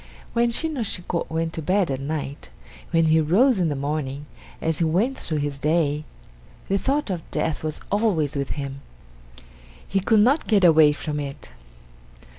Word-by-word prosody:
When 235 0 +2
Shin 315 +7 +1
no 270 - -3
Shiko 180 -5 -2
went 160 0 -2
to 160 - -4
bed 185 0 +1
at 130 - -2
night, 140 - -5 0.4
when 165 -1 +3
he 160 0 +4
rose 205 - +3
in 170 -3 +2
the 145 - -2
morning, 140 0 -3 0.3
as 160 -1 -1
he - - +2
went 190 +12 +1
through 155 - -3
his 145 -1 -3
day, 150 -1 +1 0.6
the 195 +1 +2
thought 275 -2 0
of 175 -3 -3
death 160 - -2
was 155 -1 -3
always 195 -9 +1
with 140 -1 -2
him. 140 -1 -5 1.1
He 195 - +1
could 215 +2 +3
not 270 +8 +3
get 205 -4 +3
away 160 -3 +7
from 150 0 -4
it. 140 - -7
160 Hz, 175 wpm, -23 LUFS, 145-200 Hz, 1.1 s, away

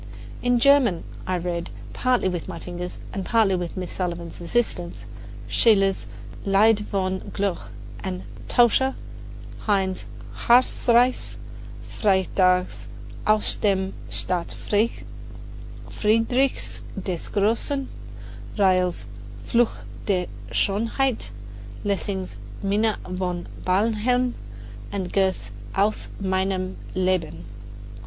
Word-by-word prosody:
In 245 0 +3
German 245 -8 +4 0.2
I 185 -1 +1
read, 170 -1 -3 0.2
partly 250 -5 +2
with 175 -3 -3
my - - -5
fingers 180 +1 -6 0.2
and 195 - -3
partly 220 -2 +3
with 175 -1 -4
Miss 180 -1 -4
Sullivan's 170 -2 -4
assistance, 175 -2 -1 0.4
Schiller's 195 -4 +3 0.4
"Lied 205 +2 +5
von 190 -1 0
der - - -12
Glocke" 195 -3 -2 0.3
and 185 -1 -3 0.2
"Taucher," 255 +2 +4 0.7
Heine's 190 -2 +1 0.4
"Harzreise," 245 0 +4 0.5
Freytag's 185 -2 +2 0.4
"Aus 215 0 +4
dem 195 -2 0 0.2
Staat 180 -2 0
Friedrichs 215 +3 0 2.0
des 180 -3 -4
Grossen," 230 +7 +1 0.7
Riehl's 185 -3 +2 0.4
"Fluch 240 -1 +1 0.2
Der 185 -3 +2 0.3
Schonheit," 230 - 0 0.6
Lessing's 190 - -2 0.3
"Minna 210 +2 +2
von 180 -1 -2 0.2
Barnhelm," 230 +6 +2 0.6
and 190 -3 -3
Goethe's 190 - +1 0.2
"Aus 205 +2 +1
meinem 190 -1 0 0.2
Leben." 180 - 0
195 Hz, 90 wpm, -24 LUFS, 185-220 Hz, 2.0 s, Lied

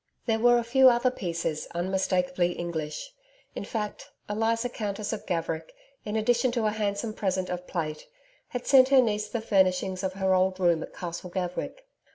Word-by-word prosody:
There 225 -2 +1
were 240 +1 +5
a 240 - +1
few 260 +3 +6
other 245 +1 +2
pieces 170 -7 -3
unmistakable 180 0 +1
English. 170 - -4 0.4
In - - -5
fact, 210 -3 -5 0.2
Eliza 225 +3 0
Countess 210 -2 -4
of 220 - -6
Gaverick, 165 - -2 0.3
in 210 - -3
addition 235 +3 +2
to 235 -3 0
a 215 - +2
handsome 210 +1 -2
present 185 -3 -1
of 180 0 -5
plate, 155 -3 -4 0.4
had 245 -1 -5
sent 260 -1 +6
her 270 -1 +6
niece 210 -3 +1
the 235 - -2
furnishings 190 -3 +2
of 190 -1 -2
her 190 0 +1
old 185 0 +2
room 170 -3 +3
at - - -8
Castle 175 +1 -6
Gaverick. 180 - -4
200 Hz, 175 wpm, -27 LUFS, 180-230 Hz, 0.4 s, few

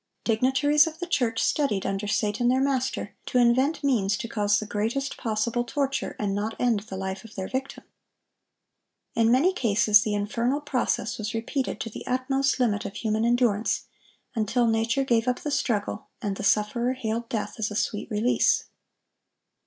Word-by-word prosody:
Dignitaries 265 +6 +3
of 320 0 -6
the 350 - -4
church 245 -9 0
studied, 245 -10 +1
under 195 +1 -2
Satan 210 +3 0
their 255 +2 +3
master, 265 -1 -1
to 250 - 0
invent 260 +6 +3
means 210 -8 +2
to 230 - -5
cause 205 -2 +1
the 215 - -3
greatest 230 +7 -2
possible 230 +1 -1
torture, 270 +1 -2
and 205 -2 -1
not 210 +3 -3
end 235 -4 +2
the 200 -2 -8
life 190 0 -4
of 225 -1 -13
their 190 -1 -4
victim. 265 +1 -4 1.3
In 230 -2 +3
many 300 +10 +4
cases 215 - +4
the 210 -1 -1
infernal 230 +7 0
process 255 -6 -1
was 215 +1 -3
repeated 255 +4 -2
to 225 - -4
the - - -8
utmost 270 +2 0
limit 215 -5 +1
of 200 0 -6
human 220 0 -1
endurance, 235 -3 +2 0.5
until 235 +2 +1
nature 225 +3 +1
gave 235 -2 +1
up 250 - 0
the 295 - -3
struggle, 215 -7 -1
and 205 -5 -2
the - - -6
sufferer 215 +5 +2
hailed 230 -2 -3
death 210 -1 -3
as 215 - 0
a 210 - -6
sweet 210 0 -2
release. 220 +3 +2
230 Hz, 170 wpm, -26 LUFS, 210-260 Hz, 1.3 s, many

